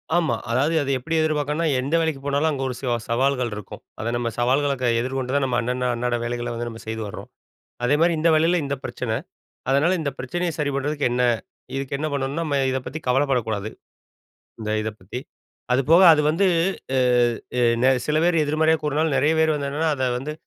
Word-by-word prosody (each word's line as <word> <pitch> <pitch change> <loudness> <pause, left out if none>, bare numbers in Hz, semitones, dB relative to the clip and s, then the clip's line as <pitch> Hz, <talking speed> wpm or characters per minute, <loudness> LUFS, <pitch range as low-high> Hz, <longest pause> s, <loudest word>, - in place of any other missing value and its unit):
ஆமா, 165 -7 +2 0.2
அதாவது 135 +7 +2
அத 140 - -3
எப்படி 165 +6 -3
எதிர்பார்க்கணும்னா 155 +1 0
எந்த 140 +5 -1
வேலைக்கு 160 -4 -1
போனாலும், 145 +3 +1
அங்கே 135 -2 -3
ஒரு 125 - -4
சவா 125 -3 -1
சவால்கள் 125 0 +1
இருக்கும். 105 -2 -9 0.2
அதை 110 - -2
நம்ம 120 -1 -1
சவால்கள்ல 130 0 +1
எதிர்கொண்டு 130 +1 -3
தான் 140 - +2
நம்ம 125 -2 0
அண்ண 125 +1 -2
அண்ணாட 120 +1 -1
வேலைகள்ல 120 0 -3
வந்து 120 +1 -4
நம்ம 115 -1 -9
செய்து 110 0 -3
வர்றோம். 100 - -9 0.6
அதேமாதிரி 155 +7 +3
இந்த 160 +2 +3
வேலையில 165 +3 +3
இந்த 140 0 -2
பிரச்சனை. 115 -3 -3 0.6
அதனால 155 +7 +3
இந்த 145 -3 -1
பிரச்சனையை 175 +7 -2
சரி 145 -2 0
பண்ணுறதுக்குm 145 0 0
என்ன 125 0 +1 0.5
இதுக்கு 135 0 -3
என்ன 155 - -2
பண்ணணும்னா, 140 +3 -2
நம்ம 145 -3 -1
இதை 130 0 -1
பத்தி 155 - -5
கவலைப்படக்கூடாது. 125 -6 0 0.9
இந்த 105 -1 -3
இத 110 - -2
பத்தி 100 +7 -6 0.5
அது 130 +2 +3
போக 170 +3 +7
அது 155 - +3
வந்து, 185 +6 +2 1.6
சில 150 - +1
பேர் 175 0 +3
எதிர்மறையா 160 +2 +2
கூறினாலும் 150 0 0
நெறைய 145 +4 +3
பேர் 160 0 +3
வந்து 140 -1 -2
என்னன்னா, 155 +3 0
அத 130 - -1
வந்து 140 +4 -5
140 Hz, 180 wpm, -23 LUFS, 125-155 Hz, 1.6 s, போக